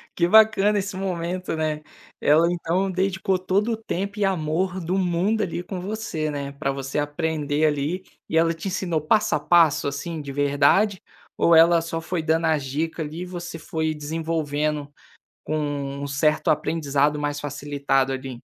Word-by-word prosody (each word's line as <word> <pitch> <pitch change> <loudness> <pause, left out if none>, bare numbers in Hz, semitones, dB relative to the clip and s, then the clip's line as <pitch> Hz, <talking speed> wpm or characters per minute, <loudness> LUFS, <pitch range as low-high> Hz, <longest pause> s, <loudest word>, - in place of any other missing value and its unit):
Que 170 -1 +2
bacana 210 0 +5
esse 195 0 -4
momento, 180 -2 -3
né. 155 -1 -2 0.4
Ela 155 +3 +4
então 180 +3 -1
dedicou 190 0 0
todo 200 +5 +1
o - - -3
tempo 200 -1 -4
e 205 - +3
amor 185 +1 -1
do 180 +2 -1
mundo 190 +4 +1
ali, 175 -1 -3
com 185 -1 -6
você, 185 -6 -3
né, 140 -1 -4
para 140 -1 -2
você 135 +1 -3
aprender 150 0 -1
ali, 150 +5 0 0.3
e 160 - +1
ela 165 0 +3
te 165 +4 -7
ensinou 175 -4 -1
passo 210 +6 +2
a - - 0
passo, 165 -5 +4
assim, 155 +3 -4
de 140 -1 -7
verdade, 145 +8 +2 0.4
ou 170 - +5
ela 165 +1 +6
só 165 0 -4
foi 170 0 -2
dando 160 +1 +1
as 155 -3 +1
dica 160 +5 -3
ali, 155 +3 -5
e - - -4
você 175 -2 -6
foi 160 0 -2
desenvolvendo 150 -1 -2 0.5
com 155 - -2 0.4
um 140 - -3
certo 150 +2 +1
aprendizado 150 -1 +1
mais 145 0 -2
facilitado 140 -2 -1
ali? 130 -2 -6
160 Hz, 170 wpm, -24 LUFS, 145-185 Hz, 0.5 s, ela